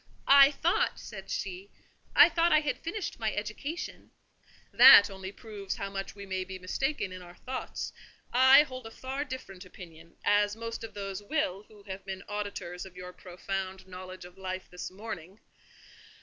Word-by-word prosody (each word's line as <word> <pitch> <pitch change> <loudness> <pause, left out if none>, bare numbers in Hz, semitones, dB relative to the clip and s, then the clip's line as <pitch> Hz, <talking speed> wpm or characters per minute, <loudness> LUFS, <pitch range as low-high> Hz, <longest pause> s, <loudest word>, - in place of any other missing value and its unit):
"I 275 0 +8
thought," 350 - 0
said - - -9
she, 380 +2 -4 0.5
"I - - +10
thought 340 0 +2
I 305 - +6
had 285 -4 -2
finished 365 - -5
my 220 -1 0
education—" 245 +10 -5 0.6
"That 200 0 +9
only 190 0 -7
proves 200 -2 -6
how 195 0 -5
much 195 0 -5
we 200 -1 -9
may 190 -1 -2
be 190 0 -7
mistaken 195 +5 -2
in 185 0 -8
our 175 0 -13
thoughts. 260 +7 -5 0.4
I 260 +3 +8
hold 255 -5 -8
a - - -8
far 265 +4 -4
different 250 -9 -8
opinion, 170 -3 -13
as 205 0 +3
most 230 0 -6
of 220 -2 -8
these 195 -1 -5
will 205 - -2
who 210 -2 -17
have 195 -1 -7
been 190 0 -6
auditors 205 -4 -5
of 190 -1 -12
your 180 0 -8
profound 190 +1 -5
knowledge 185 0 -9
of 180 +2 -14
life 185 0 -5
this 180 - -6
morning. 190 -1 -8
200 Hz, 170 wpm, -30 LUFS, 185-260 Hz, 0.6 s, I